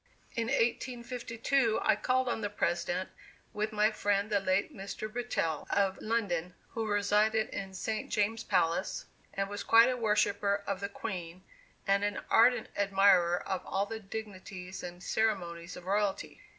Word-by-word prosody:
In 230 -1 -1
1852 235 0 0
I - - +4
called 260 0 +1
on 235 - -1
the 205 - -1
President 180 -2 -1 0.4
with 215 +1 -1
my 215 0 +3
friend 205 0 0
the 205 - +3
late 190 0 0
Mr. 200 +2 -5
Brettell, 215 -9 -2
of 195 -1 +1
London, 180 -6 -1
who 225 -1 -3
resided 210 +1 +2
in 190 -1 -6
St. 215 +3 -3
James 220 +2 0
Palace, 180 -1 0 0.3
and 195 0 0
was 205 +1 -5
quite 230 +2 +6
a 255 - 0
worshipper 210 -2 +1
of 200 -1 -2
the 200 0 -3
Queen, 180 -4 -6 0.4
and 200 +1 +2
an 205 0 -1
ardent 235 0 +5
admirer 195 -3 +3
of 190 - -2
all 195 +1 -1
the 225 +1 -6
dignities 195 -3 -7
and 175 0 -8
ceremonies 175 -6 -1
of 180 - -11
royalty. 200 0 -1
205 Hz, 150 wpm, -31 LUFS, 190-220 Hz, 0.4 s, quite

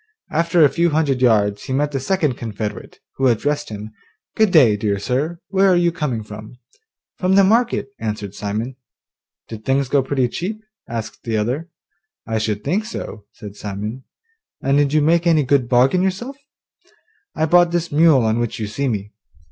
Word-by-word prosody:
After 165 0 +3
a - - +4
few 170 +4 +1
hundred 145 -4 0
yards 105 -4 +2
he 130 - -4
met 145 +2 0
the 135 - -2
second 155 -3 0
confederate, 105 -2 -6 0.2
who 135 - +2
addressed 145 +5 0
him, 105 0 -7 0.4
'Good 220 -1 +3
day, 135 - +5
dear 105 -1 -1
sir, 135 +11 -2
where 195 0 +3
are 185 - +4
you 175 -1 +3
coming 150 -10 -3
from?' 105 +3 -10 0.6
'From 185 +1 +2
the 200 - +6
market,' 230 +2 +2
answered 105 -3 -4
Simon. 110 +6 -4 0.7
'Did 110 -1 -9
things 135 +1 0
go 140 -1 +3
pretty 130 -1 0
cheap?' 210 - -5 0.3
asked 115 -1 -5
the 115 -2 -1
other. 130 +11 -2 0.6
'I 110 -1 -1
should 110 -1 0
just 105 - -24
think 210 +4 0
so,' 110 - -7
said 105 -1 -10
Simon. 105 +5 -6 0.6
'And 140 +2 +2
did 145 -1 +2
you 155 0 +3
make 170 +2 +3
any 160 -3 +4
good 130 -2 +1
bargain 130 +8 +4
yourself?' 195 +9 -2 1.0
'I 160 - +1
bought 175 +2 +5
this 170 0 -2
mule 150 -4 +5
on 110 +1 +1
which 120 -2 -2
you 110 - -3
see 120 +7 -2
me. 105 -4 -3
135 Hz, 180 wpm, -20 LUFS, 110-170 Hz, 1.0 s, the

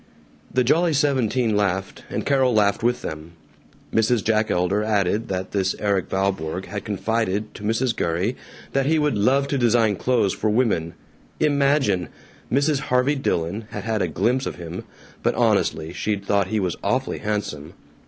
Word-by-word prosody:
The 130 - +2
Jolly 165 +6 +3
Seventeen 130 -5 +1
laughed, 95 -1 -1
and - - -3
Carol 130 -4 +3
laughed 105 -1 +3
with 120 +1 0
them. 80 +2 -6 0.6
Mrs. 115 0 +2
Jack 110 0 +1
Elder 90 +4 +1
added 105 +1 +1
that 95 -1 -3
this 95 -2 0
Erik 100 -4 0
Valborg 95 -2 -1
had 100 -2 -5
confided 105 0 -1
to - - -11
Mrs. 115 +3 0
Gurrey 90 +9 -1 0.4
that 135 0 +1
he 160 +1 +3
would 150 -3 +1
"love 130 +7 +2
to 140 - 0
design 115 -3 +3
clothes 115 -2 +1
for 110 - -1
women." 105 -8 +1 0.4
Imagine! 140 - +2 0.4
Mrs. 140 +3 +2
Harvey 130 0 +1
Dillon 105 - -1
had 105 - -6
had 110 -1 -1
a 90 - +1
glimpse 120 - 0
of - - -4
him, 85 0 -7 0.4
but - - +1
honestly, 80 +1 +1
she'd 100 +1 -2
thought 100 -2 +2
he 110 +2 0
was 90 -4 -1
awfully - - 0
handsome. 100 -8 -4
105 Hz, 165 wpm, -23 LUFS, 95-125 Hz, 0.6 s, Jolly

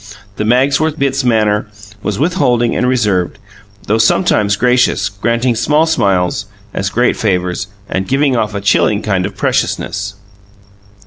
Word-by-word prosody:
The 105 - -1
Magsworth 135 +6 +2
Bitts 140 -1 0
manner 110 -3 +1 0.3
was 105 -1 -2
withholding 130 -7 +1
and 125 - +1
reserved, 105 -8 0 0.5
though 110 +2 +1
sometimes 110 - +2
gracious, 125 -3 +2
granting 115 +5 0
small 150 +8 +2
smiles 100 - 0 0.3
as 95 0 -2
great 120 +5 +1
favours 90 -3 -1 0.2
and 95 0 -3
giving 135 0 +1
off 110 -2 -1
a 100 - -3
chilling 100 +1 +2
kind 95 -3 0
of 100 -1 -11
preciousness. - - -1
110 Hz, 135 wpm, -15 LUFS, 100-130 Hz, 0.5 s, Magsworth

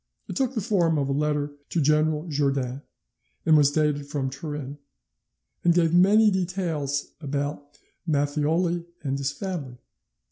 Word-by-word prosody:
It - - -6
took 265 -1 0
the 220 - 0
form 175 -7 +2
of 140 -1 0
a - - +1
letter 145 0 0 0.2
to 170 - 0
General 155 +2 +2
Jourdan, 140 -3 -1 0.6
and 160 - +6
was 145 -2 +6
dated 145 -1 0
from 140 -2 -2
Turin, 145 0 -6 0.8
and 170 -1 +4
gave 165 -2 +3
many 205 +5 +6
details 170 -7 -2
about 145 0 -4 0.3
Matthioli 155 +4 +1 0.2
and 140 -1 -1
his 135 0 -1
family. 145 -7 -5
150 Hz, 140 wpm, -25 LUFS, 140-170 Hz, 0.8 s, and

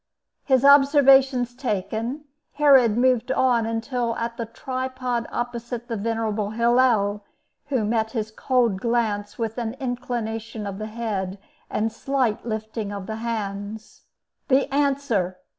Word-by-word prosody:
His 265 -1 +3
observations 275 -3 +5
taken, 230 +3 -3 0.3
Herod 265 -7 +5
moved 255 0 +2
on 245 -4 +2
until 230 +1 -2
at 230 0 -3
the 230 -2 -4
tripod 255 0 -3
opposite 240 0 -4
the 230 - -3
venerable 220 -1 -1
Hillel, 230 -3 +2 0.4
who 260 -7 0
met 220 0 0
his 220 -3 -3
cold 235 -4 +1
glance 220 -4 -1
with 225 0 -3
an 230 0 -3
inclination 235 -4 -4
of 200 0 -5
the 215 - -4
head, 210 -4 -3 0.3
and 215 - -1
a - - +1
slight 255 -3 -1
lifting 220 -1 -4
of 200 -2 -6
the 220 +1 -5
hands. 215 -2 -5 0.5
"The 270 -1 +4
answer!" 270 -10 0
230 Hz, 130 wpm, -24 LUFS, 220-255 Hz, 0.5 s, observations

